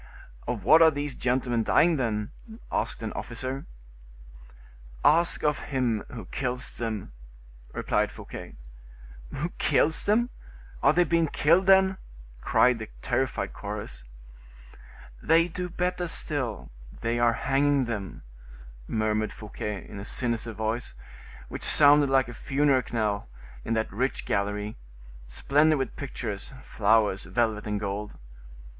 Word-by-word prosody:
"Of 120 -5 -3
what 160 - +7
are 160 - +9
these 145 -2 -3
gentlemen 125 -1 0
dying, 165 +8 +4
then?" 105 -5 -1 0.4
asked - - -2
an 110 - -4
officer. 130 +3 -5 1.4
"Ask 170 +3 +4
of 150 -1 +1
him 125 -6 0
who 115 -6 -7
kills 125 +4 -3
them," 110 - -4 0.6
replied - - 0
Fouquet. - - -9 0.8
"Who 160 +6 -3
kills 160 +1 +2
them? 235 +4 +2 0.5
Are 140 - +6
they 175 +3 +4
being 170 -1 +2
killed, 170 +6 +3
then?" 190 0 +5 0.4
cried 125 -2 +3
the 110 - -7
terrified 130 +1 -1
chorus. - - -7 1.2
"They 165 +1 +4
do 180 +1 -4
better 180 0 -1
still; 135 -9 -2 0.3
they 115 +1 0
are 120 -1 +4
hanging 140 +2 +2
them," 105 -6 -5 0.6
murmured 110 0 0
Fouquet, 105 -1 -6
in 100 - -8
a - - -6
sinister 115 0 -2
voice, 110 +3 -3 0.5
which - - -7
sounded 145 -1 +5
like 135 -1 +3
a 120 - -8
funeral 140 +1 +2
knell 105 - -1 0.3
in 115 - -1
that 110 0 -1
rich 130 +2 -1
gallery, 105 +1 -2 0.5
splendid 150 - +3
with 135 -3 -3
pictures, 115 -4 -5
flowers, 105 -4 +2
velvet, 110 -3 0
and 105 -1 -1
gold. 105 +1 -4
125 Hz, 125 wpm, -27 LUFS, 110-145 Hz, 1.4 s, are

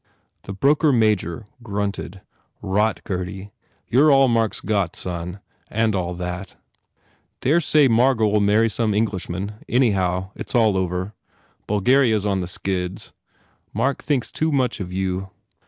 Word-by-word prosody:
The 100 - -6
broker 145 - +3
major 110 -5 +1 0.2
grunted, 100 -3 -4 0.4
"Rot, 105 +2 0
Gurdy. 95 +2 -5 0.4
You 135 +6 +4
re - - +6
all 135 -1 +6
Mark 115 -2 +1
s - - -4
got 100 -4 -1
Son, 90 +1 -5 0.3
and 110 0 +1
all 90 -2 -2
that. 90 +2 -6 0.9
Dare 155 +6 +3
say 150 -2 +4
Margot 120 -1 +3
ll 105 0 +2
marry 105 +3 +3
some 110 -1 -1
Englishman. 100 -1 -2
Any 125 -2 +3
how, 95 -1 -1
it - - -8
s - - -2
all 110 -4 +4
over. 95 +2 -2 0.5
Bulgaria 115 +4 +3
s 105 - -4
on 100 -2 0
the 90 - -4
skids. 90 0 -4 0.6
Mark 140 0 0
thinks 140 -5 -1
too 160 0 0
much 130 -5 0
of 90 -3 -5
you." 95 0 -2
105 Hz, 155 wpm, -22 LUFS, 95-115 Hz, 0.9 s, re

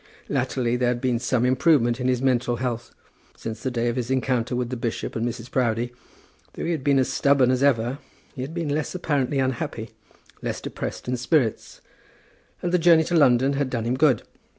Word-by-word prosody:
Latterly 125 -1 0
there 125 0 +1
had 120 0 0
been 125 -2 0
some 125 0 +1
improvement 125 -2 +3
in 125 - -1
his 125 0 +1
mental 125 -2 +2
health. 120 -1 -3 0.5
Since 110 0 -6
the 130 - -1
day 120 -1 -1
of 120 +1 -1
his 120 -1 -2
encounter 125 -2 0
with 125 0 -2
the - - -2
bishop 115 -1 -4
and 115 - -1
Mrs. 120 0 -4
Proudie, 120 -1 0 0.6
though - - -5
he 170 - 0
had 155 -6 -2
been 140 -1 +3
as 130 - +3
stubborn 140 -3 +3
as 130 0 0
ever, 130 -1 +2 0.3
he 130 - -6
had 135 +4 -4
been 165 -3 -2
less 150 +4 -2
apparently 145 -6 0
unhappy, 120 -4 -2 0.5
less - - -3
depressed - - -6
in 125 0 -1
spirits. 125 -2 0 0.8
And 175 - 0
the 180 - +3
journey 165 -1 +6
to 175 - -1
London 135 -3 +4
had 140 -1 -1
done 120 -3 -2
him 120 +2 0
good. 130 -5 +3
125 Hz, 200 wpm, -24 LUFS, 120-140 Hz, 0.8 s, journey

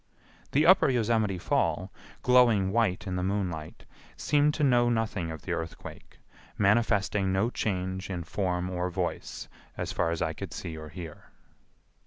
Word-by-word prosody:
The 150 +3 +3
Upper 180 -4 +6
Yosemite 110 -5 +1
Fall, - - 0 0.3
glowing 120 -6 +4
white 105 -5 +1
in 95 -2 -3
the - - -1
moonlight, 90 -5 -3 0.3
seemed 150 0 +2
to 150 - -1
know 120 -3 +4
nothing 110 -7 -1
of 80 -2 -7
the - - -5
earthquake, 80 0 -7 0.4
manifesting 105 -2 +2
no 100 +6 +1
change 95 -3 -2
in 90 -3 -3
form 90 +1 -2
or 90 0 -1
voice, 85 - -4 0.3
as - - -3
far 85 - 0
as 85 -1 -2
I 80 - -1
could - - -7
see 80 - -6
or 80 -1 -8
hear. 80 -1 -9
95 Hz, 155 wpm, -28 LUFS, 90-115 Hz, 0.4 s, Upper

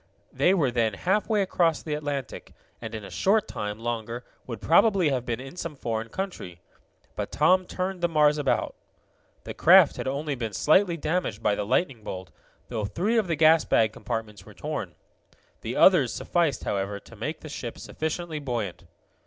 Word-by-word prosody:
They 185 - +3
were 145 -9 +2
then 115 -4 +1
halfway 210 - +1
across 170 -4 +1
the 155 - -3
Atlantic, 145 -4 -5 0.3
and 115 -1 -6
in 105 -2 -6
a - - -10
short 210 +2 +2
time 105 0 -4
longer 115 +1 -4 0.2
would 115 -4 -5
probably 180 - +4
have 130 -3 -2
been 120 -1 -2
in 135 +4 -9
some 170 -4 -5
foreign 115 -3 -3
country. 180 - -6 0.6
But - - -4
Tom 180 +5 +3
turned 185 0 -3
the 175 - +3
Mars 150 -2 +3
about. 140 - 0 0.7
The - - -6
craft - - +6
had - - -4
only 140 +2 -2
been 115 -5 -4
slightly 170 - +3
damaged 155 - -2
by 105 - +3
the 100 0 -3
lightning 130 -1 0
bolt, 95 -3 -7 0.4
though 110 -4 -3
three 210 - +1
of 210 - -1
the 165 - 0
gas 160 +1 +5
bag 110 -1 +2
compartments 110 -4 -5
were - - -15
torn, - - -5 0.7
The - - -4
others 160 -11 +5
sufficed, 170 -5 0
however, 100 0 -2
to 115 - -15
make 145 +9 -5
the - - -9
ship 125 -5 -6
sufficiently 160 0 -4
buoyant. 115 -11 -4
140 Hz, 180 wpm, -26 LUFS, 115-170 Hz, 0.7 s, craft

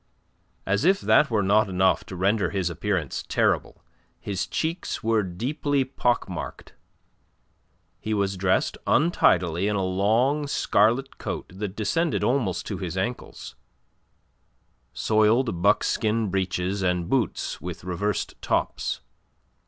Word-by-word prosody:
As 100 +2 +1
if 195 +3 +4
that 150 - +4
were 110 -3 +1
not 105 +2 +3
enough 95 0 +2
to 95 - -8
render 100 +3 +1
his 95 -4 -1
appearance 85 -4 -2
terrible, - - 0 0.4
his 100 -2 -3
cheeks 165 +3 -3
were 110 -1 +2
deeply 135 - -1
pock 125 -2 0
marked. - - -7 1.3
He 110 - -5
was 100 -1 0
dressed 95 0 0
untidily 90 - +3
in 105 - 0
a 95 -2 0
long 115 +10 +1
scarlet 120 +1 +1
coat - - -5
that 100 0 -5
descended 155 - 0
almost 120 -9 0
to - - -4
his 90 0 -4
ankles, 120 - -4 1.4
soiled 110 - +2
buckskin 105 +1 +2
breeches 95 0 -1
and 90 -2 0
boots 130 +1 -1
with 90 -1 -7
reversed 95 +3 -2
tops. - - -1
100 Hz, 120 wpm, -25 LUFS, 95-120 Hz, 1.4 s, if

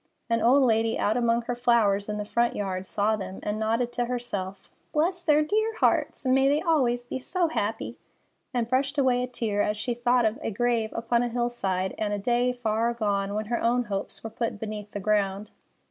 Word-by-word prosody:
An 230 -1 +2
old 265 +4 +5
lady 225 -2 +2
out 215 - +1
among 235 -1 +2
her 245 - -2
flowers 225 -5 +2
in 210 - -2
the 210 - -3
front 235 +3 +1
yard 190 -2 -3
saw 210 +2 +1
them, 190 -2 -6
and 210 +1 -2
nodded 230 +2 0
to 240 0 -1
herself: 200 -6 -4 0.3
"Bless 350 +4 +1
their 305 -3 +4
dear 435 +7 0
hearts! - - +1
May 265 +1 +4
they 290 +2 +3
always 255 -8 +1
be 250 - -4
so 345 +5 0
happy!" 225 -7 -3 0.5
and 240 -2 -1
brushed 270 +4 0
away 255 -3 +3
a 250 - -1
tear 225 -4 -1
as 210 +1 0
she 240 +3 -2
thought 240 0 +2
of 220 +5 0
a - - -2
grave 230 0 0
upon 230 +1 +1
a 245 - 0
hillside, 230 -6 -1
and 210 -1 -1
a - - 0
day 240 +4 +1
far 230 -2 0
agone 205 -4 -1
when 215 +1 -2
her 235 +2 -2
own 245 +2 +2
hopes 200 -3 -5
were 225 - -6
put 225 -2 -3
beneath 210 -1 -5
the 205 - -5
ground. 200 0 0
235 Hz, 205 wpm, -26 LUFS, 210-245 Hz, 0.5 s, old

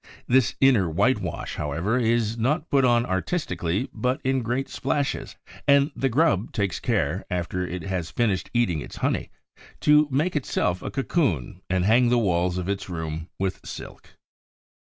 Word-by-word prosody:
This 130 -2 +3
inner 120 -10 +4
whitewash, 100 +11 0
however, 85 - -1
is 115 -1 +1
not 150 +8 -1
put 140 -1 +4
on 120 -1 +4
artistically, 95 - -1
but 125 +1 -1
in 130 0 +1
great 125 +4 -1
splashes; 140 +1 -2 0.3
and 140 +1 +5
the 135 - 0
grub 120 - +2
takes 100 -4 -1
care, 95 - 0
after 90 0 -2
it 90 0 -5
has 95 -3 -3
finished 105 -6 0
eating 95 -11 +1
its - - -9
honey, - - -1 0.5
to 150 0 +5
make 150 +7 0
itself 95 -10 0
a - - -4
cocoon 110 - -1
and 95 0 +1
hang 120 +4 +4
the 125 - +3
walls 90 -4 +1
of 90 -1 -3
its 100 0 -3
room 80 -1 -4
with 95 -1 -2
silk. - - -10
110 Hz, 155 wpm, -25 LUFS, 90-130 Hz, 0.5 s, and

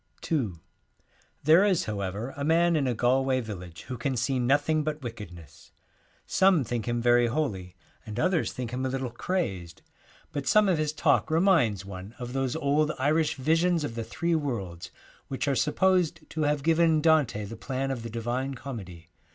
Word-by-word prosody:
ii 130 - +1 0.9
There 160 +6 +6
is, 195 -5 +2
however, 105 +4 -4
a 140 - -4
man 170 +2 +3
in 145 -4 +1
a 125 - 0
Galway 130 +3 +2
village 90 -8 -8
who 125 -2 -7
can 130 +1 -1
see 125 +3 0
nothing 145 +5 +2
but 150 -1 -4
wicked 115 -6 -7
ness. 85 -5 -15 0.5
Some 190 -6 +3
think 120 -1 -3
him 120 -1 -1
very 120 0 +4
holy, 105 - -3 0.3
and 110 +2 -6
others 180 0 +1
think 125 -2 -5
him 125 +1 -3
a 130 - 0
little 130 -2 -3
crazed, 100 - -3 0.5
but 140 -2 -4
some 215 - +5
74 195 - +3
of - - 0
his 155 -1 -1
talk 155 - +2
reminds 160 - +3
one 100 +2 -9
of 125 -1 -6
those 135 -2 -1
old 150 0 +1
Happy - - -4
and 130 - -1
Irish 155 0 +1
visions 165 +4 +2
of 120 - -3
the 115 0 -4
Three 170 +9 -2
Worlds, 100 - -3 0.4
which 135 - -3
Theologians. 140 -2 +1
are - - +2
supposed 175 -1 +1
to 160 - -3
have 145 -1 0
given 165 0 +3
Dante 150 -10 +2
the 110 +3 -8
plan 135 +3 -3
of 125 -3 -4
the 115 - -6
Divine 120 +4 -3
Comedy. 95 -11 -8
130 Hz, 190 wpm, -27 LUFS, 115-155 Hz, 0.9 s, There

